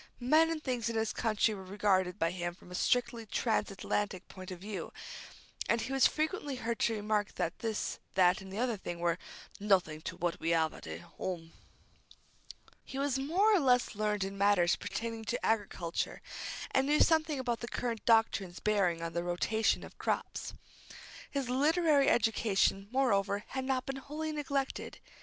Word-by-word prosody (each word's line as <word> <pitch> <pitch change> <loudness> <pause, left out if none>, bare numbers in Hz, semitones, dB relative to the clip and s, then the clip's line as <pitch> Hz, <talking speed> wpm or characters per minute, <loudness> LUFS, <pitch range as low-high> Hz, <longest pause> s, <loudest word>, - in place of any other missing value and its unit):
Men 310 +6 +4
and 320 -2 -3
things 245 -3 -1
in 230 - -3
this 220 0 0
country 220 -1 +1
were 195 - -7
regarded 190 -2 +1
by 165 +1 +1
him 175 -1 -3
from 180 - -16
a - - -7
strictly 240 +3 +1
trans 225 +2 0
Atlantic 195 0 -2
point 185 -1 -10
of 185 - -6
view, 205 +2 -5 0.8
and 230 - +3
he 265 - -3
was 270 - +6
frequently 310 -3 -2
heard 235 -2 -3
to 225 - +2
remark 210 -1 -1
that 165 - -2
this, 225 -2 -2 0.2
that, 185 0 +4
and 190 0 -10
the 195 - -6
other 240 -2 0
thing 175 -3 -6
were 170 0 +1 0.4
"nothink 180 -7 +2
to - - -4
what 175 0 -1
we 165 +1 +1
'ave 160 -1 +1
at - - -11 0.3
'ome." 165 -3 -4 1.3
He 265 - -8
was 275 -1 0
more 365 +10 +3
or - - +4
less 250 -4 +3
learned 210 -1 0
in 195 0 -5
matters 200 -4 +4
pertaining 230 0 -4
to 245 +3 -2
agriculture, 200 -6 -1 0.5
and 265 0 +2
knew 300 +1 +3
something 315 -2 +3
about 240 -3 -1
the 235 - -5
current 235 -2 -3
doctrines 225 -5 +2
bearing 185 -6 +1
on 165 0 -4
the 170 +1 -1
rotation 190 +5 +1
of - - -12
crops. - - -2 0.7
His 275 -3 -2
literary 290 +2 +3
education, 210 -3 +2
moreover, 205 -6 +1
had 265 0 -3
not 260 -1 0
been 270 0 -4
wholly 305 +3 -4
neglected. 280 -3 -3
220 Hz, 175 wpm, -32 LUFS, 190-265 Hz, 1.3 s, was